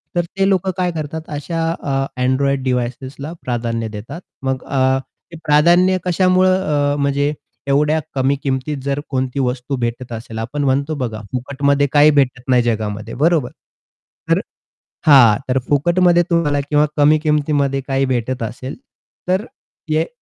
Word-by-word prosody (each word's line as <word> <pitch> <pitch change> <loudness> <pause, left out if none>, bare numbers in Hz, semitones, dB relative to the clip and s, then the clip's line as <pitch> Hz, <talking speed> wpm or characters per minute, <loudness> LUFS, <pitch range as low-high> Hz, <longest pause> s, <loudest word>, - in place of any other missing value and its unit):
तर 175 - +3 0.2
ते 195 - +3
लोकं 190 -1 +1
काय 180 -1 0
करतात, 160 -1 -5
अशा, 155 +3 -4
अ, 135 -4 -2 0.2
Android 135 +1 +1
डिव्हाइसेसला 130 +4 -3
प्राधान्य 115 -2 -2
देतात. 110 - -8 0.2
मग 130 -1 -2
अ, 130 -1 +1 0.3
ते 165 - -9
प्राधान्य 175 +5 +4
कशामुळं, 185 -5 +2
अ, - - -1
म्हणजे 140 +1 +1 0.3
एवढ्या 150 +3 +2 0.2
कमी 135 +1 +2
किमतीत 135 +2 -2
जर 140 +1 -1
कोणती 130 0 -2
वस्तू 125 +1 -1
भेटत 120 +1 -3
असेल, 115 0 -7
आपण 135 +6 -3
म्हणतो 140 +3 0
बघा, 115 -5 -4
फुकटमध्ये 140 +2 0
काही 150 +1 +6
भेटत 135 -3 +1
नाही 125 -2 +4
जगामध्ये, 110 -1 -2
बरोबर. 150 -2 +2 0.8
तर - - +4 0.7
हां, 125 -8 +7
तर 130 - +2
फुकटमध्ये 175 +4 +3
तुम्हाला 150 -4 +1
किंवा 145 +1 +2
कमी 150 +1 +5
किमतीमध्ये 145 -3 +1
काही 135 0 +1
भेटत 130 0 -2
असेल, 125 +4 -6 0.5
तर 190 +4 +1 0.5
एक 160 +2 +1
140 Hz, 140 wpm, -18 LUFS, 130-155 Hz, 0.8 s, हां